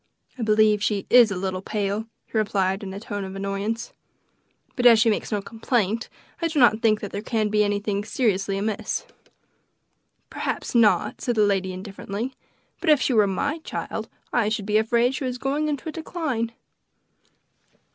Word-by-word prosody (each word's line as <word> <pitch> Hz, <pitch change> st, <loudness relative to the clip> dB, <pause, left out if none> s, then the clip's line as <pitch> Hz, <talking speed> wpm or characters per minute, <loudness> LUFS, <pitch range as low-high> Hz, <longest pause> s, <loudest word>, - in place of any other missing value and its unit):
"I 255 Hz, -, -8 dB
believe 215 Hz, -1 st, +4 dB
she 205 Hz, -2 st, 0 dB
is 240 Hz, -2 st, +8 dB
a 200 Hz, -, -3 dB
little 185 Hz, 0 st, -3 dB
pale," 210 Hz, +1 st, -2 dB, 0.2 s
he -, -, -15 dB
replied 195 Hz, -3 st, +1 dB
in 195 Hz, -2 st, -6 dB
a 195 Hz, -, -6 dB
tone 205 Hz, -2 st, -5 dB
of 190 Hz, 0 st, -7 dB
annoyance; 200 Hz, +3 st, -3 dB, 0.8 s
"but 245 Hz, -2 st, +5 dB
as 230 Hz, -2 st, +8 dB
she 225 Hz, 0 st, +4 dB
makes 210 Hz, -, -2 dB
no 205 Hz, -2 st, -1 dB
complaint, 225 Hz, -1 st, -1 dB, 0.3 s
I 335 Hz, -, +2 dB
do 320 Hz, -1 st, -4 dB
not 225 Hz, -4 st, +5 dB
think 215 Hz, -2 st, +3 dB
there 205 Hz, 0 st, -4 dB
can 215 Hz, -1 st, 0 dB
be 210 Hz, 0 st, +3 dB
anything 205 Hz, 0 st, -1 dB
seriously 200 Hz, -4 st, 0 dB
amiss." 215 Hz, -, -2 dB, 1.3 s
"Perhaps -, -, -3 dB
not," 230 Hz, -3 st, +3 dB
said 240 Hz, -, -1 dB
the 215 Hz, -1 st, +4 dB
lady 195 Hz, -2 st, 0 dB
indifferently; 200 Hz, +5 st, -5 dB, 0.5 s
"but 350 Hz, -, -1 dB
if 300 Hz, -2 st, +6 dB
she 260 Hz, -, +1 dB
were 210 Hz, -3 st, +5 dB
my 285 Hz, -, -1 dB
child 315 Hz, -, -5 dB, 0.2 s
I 230 Hz, -4 st, +2 dB
should 215 Hz, -2 st, -2 dB
be 210 Hz, +1 st, +2 dB
afraid 235 Hz, +3 st, +2 dB
she 270 Hz, -, -4 dB
was 250 Hz, -1 st, -2 dB
going 280 Hz, +4 st, -1 dB
into 290 Hz, 0 st, -3 dB
a -, -, -2 dB
decline." 300 Hz, -9 st, -3 dB
215 Hz, 175 wpm, -24 LUFS, 200-240 Hz, 1.3 s, is